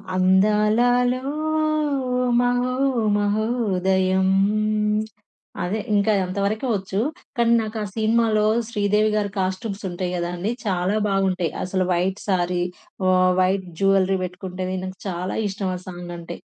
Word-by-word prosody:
అందాలలో 215 +7 +3 1.2
మహో 245 +1 +1 0.4
మహోదయం 190 -3 +1 1.4
అదే. 190 +5 -1 0.2
ఇంకా 205 +2 +3
అంతవరకే 200 +5 -2
వొచ్చు. 195 -1 -2 0.4
కానీ 235 0 +3
నాకు 220 0 -5
ఆ - - -3
సిన్మాలో 220 -1 +2 0.2
'శ్రీదేవిగారి' 210 -1 +1
కాస్ట్యూమ్స్ 195 +2 -3
ఉంటాయి 180 0 -3
కదండీ! 175 +4 -2
చాలా 185 0 0
బావుంటాయి. 190 -4 0
అసలు 185 0 0
వైట్ 185 +3 0
సారీ 180 -1 +1 0.4
వొ 185 - +4 0.3
వైట్ 190 +1 +1 0.2
జ్యువెల్లరీ 195 -1 +3
పెట్టుకుంటే, 185 0 -5 0.2
నాకు 185 0 -8
చాలా 180 0 -3
ఇష్టం 195 -1 -3
ఆ - - -10
సాంగ్ 175 -1 -7
అంటే. 170 -1 -8
195 Hz, 110 wpm, -23 LUFS, 185-215 Hz, 1.4 s, వొ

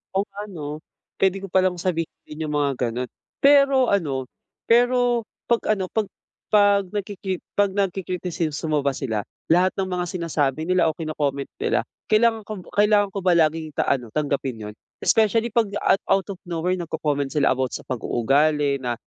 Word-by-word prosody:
Kung 200 0 0
ano, 155 -7 -6 0.4
puwede 195 0 +1
ko 195 - -7
palang 185 -1 +3
sabihin 170 -2 -1 0.2
iyung 150 -1 -5
mga 145 -1 +2 0.2
ganoon. 125 +2 -4 0.3
Pero 275 -2 +5
ano, 145 -10 0 0.4
pero 245 -1 +3 0.2
kapag 230 -2 +1
ano, 190 -2 -4
'pag 215 -3 0 0.4
'pag 205 -2 +4
nagkiki 195 -1 -4 0.2
kapag 200 -1 +1
nagki-kritisismo 175 -5 -1
ba 140 -1 0
sila, 110 -6 -3 0.2
lahat 180 +2 +4
ng 190 -1 -2
mga 180 -1 -1
sinasabi 155 -5 -1
nila 180 0 +2
o 155 - -1
kino-comment 145 -4 -3
nila, 445 +1 +1 0.2
kailangan 220 0 +2
kob 210 -4 -6
kailangan 205 -1 +3
ko 200 - -3
ba 180 -2 +3
laging 155 -2 +1
ta - - +1
ano 125 -4 0
tanggapin 140 -4 -1 0.2
iyun? - - -19 0.3
Especially, 225 +1 +3
kapag 215 -3 +1
at 195 - +4
out 195 +1 +1
of 185 - -8
nowhere 175 +2 -1
nagko-comment 145 -4 -1
sila 145 - +3
about 130 0 -1
sa - - -7
pag-uugali 140 +4 +1
na, 120 -2 -2
180 Hz, 160 wpm, -23 LUFS, 150-205 Hz, 0.4 s, Pero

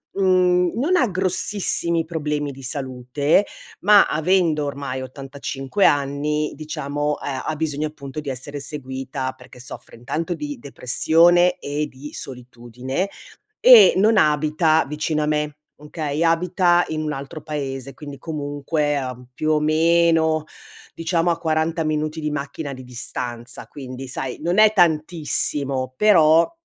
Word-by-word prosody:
Mhmm, 180 -2 +3
non 325 +9 +2
ha 260 -8 +3
grossissimi 185 -3 0
problemi 150 -3 -3
di 135 0 -12
salute, 135 +5 0 0.3
ma 205 +1 +6
avendo 160 -1 +1
ormai 140 -2 -4
85 135 +5 -3
anni 145 +2 +1
diciamo, 150 -1 -3
ehm, 135 -2 -4
ha 155 - -2
bisogno 155 -1 -2
appunto, 150 -1 -8
di 150 - -5
essere 135 +2 -5
seguita. 130 -1 -5
Perché 125 - -15
soffre, 125 -1 -10
intanto, 155 +9 -3
di 290 -3 -6
depressione 175 - +3
e 150 -2 -3
di 145 +2 -11
solitudine 125 - -5 0.5
e - - +9
non 215 +3 +4
abita 155 0 +3
vicino 150 +1 -2
a 150 - 0
me, 150 -1 -1 0.2
okay, 150 +1 -3
abita 175 +1 +3
in 155 0 -3
un 150 -1 -2
altro 140 +3 -7
paese, 135 -3 -5
quindi 145 -2 -9
comunque, 145 0 -2
ehm, 125 -2 -5
più 155 +5 -1
o 155 - +3
meno 160 0 +3 0.5
diciamo 165 +1 0
a 170 - +1
40 160 0 0
minuti 155 +1 -2
di 150 -1 -2
macchina 140 0 -5
di 130 0 -10
distanza. 120 -1 -6
Quindi, 130 -2 -8
sai, 125 0 -5
non 175 +4 0
è 215 0 +6
tantissimo, 150 - 0
però 165 -4 +5
150 Hz, 135 wpm, -22 LUFS, 140-165 Hz, 0.5 s, e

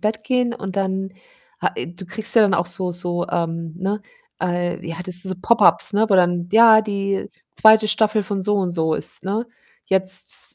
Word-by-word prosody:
Bett 215 0 -2
gehen 250 -1 0
und 195 -5 -7
dann 190 0 -2 0.5
ha - - +1
äh, - - -4
du 175 +2 -11
kriegst 210 +6 -2
ja 230 - +6
dann 200 - +3
auch 170 - +1
so 175 +1 -4
so 175 0 -3
ähm, 165 -1 -3
ne 195 +3 -2 0.4
äh, 175 -1 -2
wie 165 0 -6
heißt 180 +2 -8
das 180 -1 -1
diese 190 0 -2
Pop-Ups, 180 -3 +3
ne, 215 +2 +2
wo 200 - +3
dann 175 -1 +2
ja, 220 -1 +7
die 200 -2 -3 0.2
2. 220 0 +5
Staffel 215 0 +2
von 195 0 -3
so 210 +2 0
und 190 -3 0
so 160 -2 0
ist, - - -6
ne, 210 +5 -2 0.4
jetzt 190 -1 -2
190 Hz, 200 wpm, -20 LUFS, 175-215 Hz, 0.5 s, ja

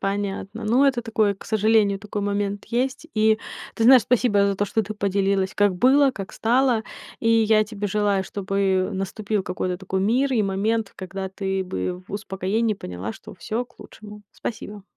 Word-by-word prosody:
Понятно. 200 +2 -3
Ну, 245 +6 +3
это 260 -3 +2
такое, 220 -3 +1
к - - -14
сожалению, 215 -2 +2
такой 205 0 -5
момент 200 0 -2
есть. 260 +6 -2
И, 220 0 +3 0.4
ты 225 - 0
знаешь, 255 -1 +8
спасибо 230 -3 +2
за 200 -1 0
то, 205 - +1
что 220 +2 0
ты 215 +2 -6
поделилась, 195 -1 0
как 205 -3 +2
было, 270 +6 +5
как 195 -6 -8
стало. 240 0 +2 0.4
И 225 - +1
я 220 -1 +4
тебе 210 -1 -4
желаю, 200 -1 +1
чтобы 195 -1 0
наступил 200 +2 -2
какой-то 180 0 -2
такой 190 0 -3
мир 255 +7 +2
и 220 -4 +2
момент, 205 +2 -1
когда 190 +1 -5
ты 190 0 -2
бы 180 - -4
в - - -11
успокоении 205 +2 -1
поняла, 90 - -6
что - - -12
всё 220 +7 -3
к 255 - -29
лучшему. 210 0 -12
Спасибо. 210 -3 -6
205 Hz, 175 wpm, -23 LUFS, 195-225 Hz, 0.4 s, знаешь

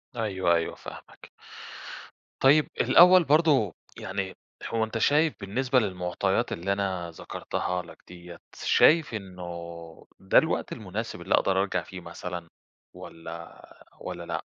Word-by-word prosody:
أيوه، 95 -6 +1
أيوه 85 0 -1
فاهمك. - - -12 1.1
طيب 145 +3 +5
الأوّل 180 0 +7
برضه 145 - +3 0.2
يعني 95 0 -4 0.3
هو 115 -1 0
أنت 110 +1 -3
شايف 150 +7 +3
بالنسبة 125 +6 +1
للمعطيات 95 +1 -1
اللي 95 +4 -1
أنا 95 -3 -3
ذكرتها 90 +2 -4
لك 85 - -14
ديَّة، 85 -1 -11 0.2
شايف 160 -5 +4
إنّه 95 -4 -7 0.8
ده 95 - +2
الوقت 160 - +2
المناسب 105 -3 -5
اللي 95 - +2
أقدر 95 0 +2
أرجع 90 -3 -1
فيه 95 +3 -9
مثلًا، 85 0 -7 0.4
والَّا 85 0 -10 0.4
والَّا 85 -1 -6
لأ؟ - - -4
95 Hz, 125 wpm, -27 LUFS, 90-120 Hz, 1.1 s, الأوّل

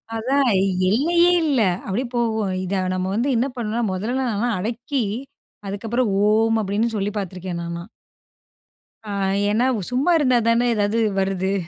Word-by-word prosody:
அதான், 265 +4 +1 0.4
எல்லையே 340 - +3
இல்லை. 260 -10 +2 0.2
அப்படியே 235 +7 -2
போகும். 220 -4 0
இத 185 +1 -1
நம்ம 185 0 -2
வந்து 240 +5 0
என்ன 240 +3 +1
பண்ணணும்ன்னா, 235 0 -2
முதல்ல 245 +7 -2
நான்லாம் 230 +2 0
அடக்கி, 235 +5 -2 0.6
அதுக்கப்புறம் 225 +4 -1 0.2
"ஓம்" 225 +1 +3
அப்படீன்னு 215 +3 -1
சொல்லி 205 +1 -1
பார்த்துருக்கேன், 185 -2 -5
நானா. 170 0 -5 1.3
அ - - -3 0.4
ஏனா, 230 +4 +2 0.3
சும்மா 270 +8 +2
இருந்தா 255 -5 +3
தானே 235 +1 +3
ஏதாவது 210 +2 +1 0.2
வருது. 190 0 0
225 Hz, 135 wpm, -22 LUFS, 195-245 Hz, 1.3 s, எல்லையே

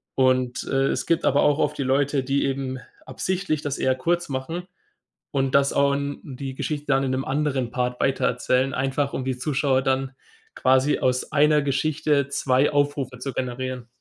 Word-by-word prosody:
und, 130 -1 +2
äh, 135 0 +1
es 125 - -1
gibt 165 -1 +1
aber 140 - +3
auch 145 0 +3
oft - - 0
die 140 - -1
Leute, 135 +1 +1
die 135 +2 0
eben 135 -1 -2 0.3
absichtlich 185 -5 -2
das 145 -2 -3
eher 130 0 +2
kurz 170 +6 -1
machen 160 +7 -4 0.6
und 135 -2 0
das 140 0 +4
auch 140 0 +3
'n 140 0 -3
die 135 -1 -6
Geschichte 150 +1 -4
dann 135 -1 +2
in 130 - -1
'nem 130 +1 -1
anderen 135 -3 -1
Part 125 0 -2
weitererzählen, 130 0 +1
einfach 135 +2 -1
um 130 - -2
die 130 -1 -2
Zuschauer 130 0 +1
dann 135 0 0 0.4
quasi 130 +2 +3
aus 125 0 0
einer 150 0 +4
Geschichte 145 +1 +1
2 135 0 +2
Aufrufe 145 -3 -1
zu 135 +2 -4
generieren. 130 -1 -4
135 Hz, 175 wpm, -24 LUFS, 130-145 Hz, 0.6 s, das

